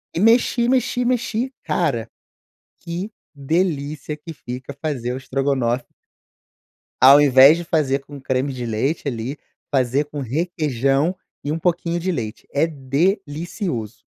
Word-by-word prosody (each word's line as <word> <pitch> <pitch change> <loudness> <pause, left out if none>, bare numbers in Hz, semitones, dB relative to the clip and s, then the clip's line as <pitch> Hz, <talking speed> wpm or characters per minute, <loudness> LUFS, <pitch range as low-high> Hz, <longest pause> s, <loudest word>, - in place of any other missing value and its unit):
e - - 0
mexi, 235 +3 +4
mexi, 250 -1 +1
mexi 245 0 0
cara 125 -10 0 0.7
que 175 +5 -5 0.2
delícia 150 0 -1
que 165 +2 -9
fica 130 0 -8
fazer 125 -6 -2
o - - -4
estrogonofe 130 -2 -1 1.2
ao 140 +2 +10
invés 140 +2 +7
de 175 - -5
fazer 145 -5 +1
com 145 -2 -10
creme 130 +1 -1
de 125 - -5
leite 120 +8 -1
ali 125 +1 -3 0.4
fazer 135 +2 +2
com 145 0 -7
requeijão 145 +1 0 0.3
e 145 - -2
um 155 - -1
pouquinho 170 0 0
de 185 +2 -1
leite, 115 -8 -5
é 145 +3 +3
delicioso. 155 - -2
145 Hz, 130 wpm, -21 LUFS, 130-170 Hz, 1.2 s, ao